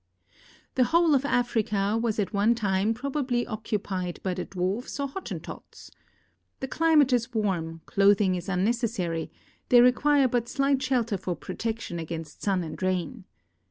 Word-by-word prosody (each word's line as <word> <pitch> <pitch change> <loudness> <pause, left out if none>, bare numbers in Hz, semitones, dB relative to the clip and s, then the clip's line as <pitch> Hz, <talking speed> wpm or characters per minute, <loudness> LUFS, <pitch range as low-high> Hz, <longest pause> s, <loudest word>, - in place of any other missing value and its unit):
The 255 - +3
whole 335 +2 +3
of 275 0 +2
Africa 215 -6 +1
was 225 -1 0
at 205 0 -1
one 210 +4 +3
time 205 0 0
probably 260 -1 -1
occupied 200 -5 -3
by 185 - -1
the 180 0 -4
Dwarfs 195 +9 -3
or 280 - 0
Hottentots. 375 +8 -8 0.7
The 265 - -4
climate 305 -3 +3
is 240 0 0
warm, 170 -6 -1
clothing 200 -1 +3
is 180 0 -4
unnec 200 +5 +1
essary; 175 -8 -2 0.4
they 245 - +7
require 270 +3 +4
but 240 -1 -1
slight 275 -1 +1
shelter 245 -5 0
for 180 -1 -3
protection 225 -6 -4
against 160 -1 -7
sun 190 -3 0
and 160 +2 -7
rain. 185 -3 -2
220 Hz, 150 wpm, -27 LUFS, 185-250 Hz, 0.7 s, they